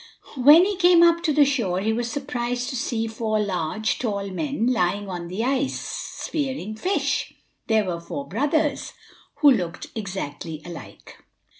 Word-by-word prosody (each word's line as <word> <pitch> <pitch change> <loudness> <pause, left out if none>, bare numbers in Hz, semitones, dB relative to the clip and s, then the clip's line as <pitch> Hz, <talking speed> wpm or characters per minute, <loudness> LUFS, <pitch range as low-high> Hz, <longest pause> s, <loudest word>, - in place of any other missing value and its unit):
When 295 +7 +7
he 405 -1 -2
came 350 -2 +6
up 335 0 +5
to 335 -3 +1
the 295 0 +5
shore 230 -10 0
he 220 +3 0
was 240 +1 -2
surprised 245 -2 -3
to - - -4
see 235 -3 -1
four 220 -1 -1
large, 200 +2 -1
tall 200 -5 -2
men 275 +4 -2
lying 205 -4 +1
on 175 -2 -5
the 190 +6 -3
ice, 270 +1 0
spearing 265 - -4
fish. 370 - -1 0.3
They 220 -1 +3
were 175 -3 -4
four 280 +11 -6
brothers, 295 +2 0 0.5
who 290 -2 +8
looked 180 -8 -2
exactly 180 -6 -5
alike. 175 -1 -11
230 Hz, 155 wpm, -24 LUFS, 195-280 Hz, 0.5 s, who